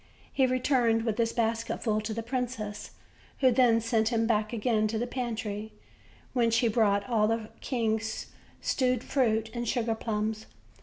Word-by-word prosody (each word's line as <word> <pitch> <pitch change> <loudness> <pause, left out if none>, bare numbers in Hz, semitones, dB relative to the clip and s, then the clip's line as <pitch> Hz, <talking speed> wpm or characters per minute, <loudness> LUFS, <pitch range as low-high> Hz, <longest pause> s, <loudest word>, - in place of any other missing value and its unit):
He 265 -2 +3
returned 250 -3 +2
with 225 -1 -2
his 230 -1 +2
basket 230 -1 -1
full 215 -2 +1
to 215 +1 -4
the 225 +1 -3
princess, 230 -4 -4 0.5
who 260 -2 +5
then 235 -2 +4
sent 225 -1 +1
him 225 -1 +1
back 215 -2 +1
again 220 -1 +1
to 220 +1 -2
the 235 - -1
pantry, 225 -4 -4 0.6
whence 230 -2 +3
he 240 0 +3
brought 205 -3 +2
all 220 -3 +2
the 225 -1 -1
king's 220 -3 -2 0.3
stewed 255 -2 +1
fruit 220 -5 +1
and 240 -1 -3
sugarplums. 220 -2 -1
225 Hz, 155 wpm, -29 LUFS, 220-240 Hz, 0.6 s, who